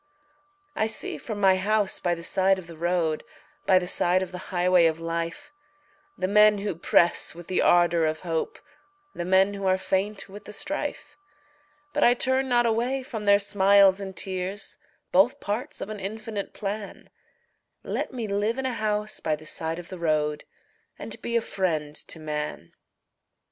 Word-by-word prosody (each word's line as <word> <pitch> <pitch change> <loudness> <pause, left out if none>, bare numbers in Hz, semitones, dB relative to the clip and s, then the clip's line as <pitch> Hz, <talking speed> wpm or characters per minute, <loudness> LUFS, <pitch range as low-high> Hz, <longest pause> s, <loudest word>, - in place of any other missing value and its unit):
I 220 - +1
see 220 - -4
from 215 -3 -6
my 190 -2 +5
house 205 +1 +1
by 175 -1 0
the 170 - -9
side 190 +2 +3
of 185 - -8
the 170 -1 -11
road 170 -1 0 0.4
By 190 - +6
the 180 - +1
side 180 +1 +2
of 185 - -7
the 180 - -6
highway 180 -2 +4
of 160 0 -1
life, 165 - -4 0.7
The 185 - -1
men 210 +1 +6
who 200 0 -2
press 170 0 +2
with 175 0 -10
the 185 - 0
ardor 175 -2 +4
of 155 0 -3
hope, 165 -3 -2 0.6
The 175 - -4
men 190 +2 +4
who 200 -1 -3
are 185 0 +3
faint 195 +2 -2
with 205 +2 -11
the 210 - -9
strife, 295 +3 -5 0.7
But 295 - +2
I 245 - +6
turn 260 +1 +1
not 240 -1 +3
away 240 +4 0
from 225 -6 -6
their 200 0 +6
smiles 200 -1 +4
and 190 -2 -7
tears, 190 +1 -4 0.3
Both 195 +7 +4
parts 210 +5 -4
of - - -5
an 210 - -6
infinite 215 +1 -5
plan 205 0 -6 0.7
Let - - -3
me 240 -4 -4
live 205 +4 0
in 265 - -2
a 260 - -1
house 215 -1 -2
by 155 -1 0
the 155 +1 -14
side 160 +1 -2
of 175 0 -9
the 185 - -8
road 150 -2 0 0.5
And - - -8
be 235 - -2
a 235 - +4
friend 160 -8 -2
to 160 - -7
man. 150 - -5
190 Hz, 180 wpm, -26 LUFS, 175-215 Hz, 0.7 s, By